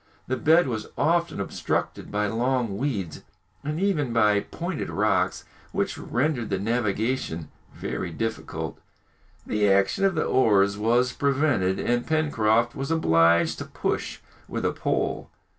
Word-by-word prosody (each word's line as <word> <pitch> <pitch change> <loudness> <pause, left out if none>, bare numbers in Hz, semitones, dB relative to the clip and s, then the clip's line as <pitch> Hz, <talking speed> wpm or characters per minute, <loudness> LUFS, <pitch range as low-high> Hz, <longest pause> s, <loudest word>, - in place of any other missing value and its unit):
The 130 - -1
bed 160 +4 +4
was 110 -4 -3
often 170 -3 +1
obstructed 100 - -3
by 105 0 0
long 115 0 0
weeds, 105 - -3 0.4
and 150 +2 -3
even 170 -10 +1
by 105 -3 +4
pointed 170 - -5
rocks, - - +1 0.3
which - - -1
rendered 125 -3 -1
the 100 - 0
navigation 110 - -1 0.2
very 90 - -4
difficult. 110 +7 -4 0.7
The 105 -1 +1
action 100 - +2
of 195 -2 +3
the 155 - +1
oars 100 -5 +3
was 120 +4 +2
prevented, 140 -10 +1
and 120 0 0
Pencroft 120 -7 +2
was 135 +1 -4
obliged 85 - +3
to - - -5
push - - -3 0.3
with - - -3
a - - +1
pole. - - -2
120 Hz, 135 wpm, -25 LUFS, 100-145 Hz, 0.7 s, bed